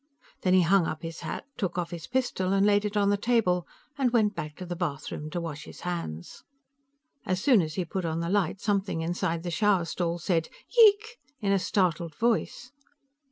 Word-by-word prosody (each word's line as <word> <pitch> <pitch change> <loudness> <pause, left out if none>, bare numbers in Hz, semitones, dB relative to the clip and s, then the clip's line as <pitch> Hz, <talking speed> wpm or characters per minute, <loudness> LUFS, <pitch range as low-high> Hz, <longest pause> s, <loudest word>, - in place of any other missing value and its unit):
Then 185 0 +3
he 185 - +5
hung 180 0 +4
up 155 +1 -5
his 165 0 -6
hat, - - -5
took 185 -5 -2
off 175 -1 -2
his 170 -2 -7
pistol 245 -7 0
and 195 0 +3
laid 205 0 +3
it 210 0 -2
on 200 -1 +3
the 205 - +2
table, 200 -6 +1 0.3
and 260 -2 +3
went 220 -3 +2
back 150 -5 -6
to 185 - -7
the 175 0 -4
bathroom 155 -2 -4
to 175 - -3
wash 155 -2 -6
his - - -12
hands. 165 - -5 0.8
As 185 -1 -1
soon 240 -2 +5
as 155 -2 -4
he 185 - -1
put 185 +3 -3
on 165 -1 -2
the 170 - -2
light, 190 -1 0
something 195 -5 -1
inside 170 0 -1
the 175 - -3
shower 195 -1 +2
stall 170 0 -2
said, 165 -1 0 0.3
"Yeeeek!" 450 +1 +5 0.2
in 200 -2 0
a 195 - +3
startled 175 -4 0
voice. 240 +3 -1
185 Hz, 205 wpm, -28 LUFS, 170-205 Hz, 0.8 s, he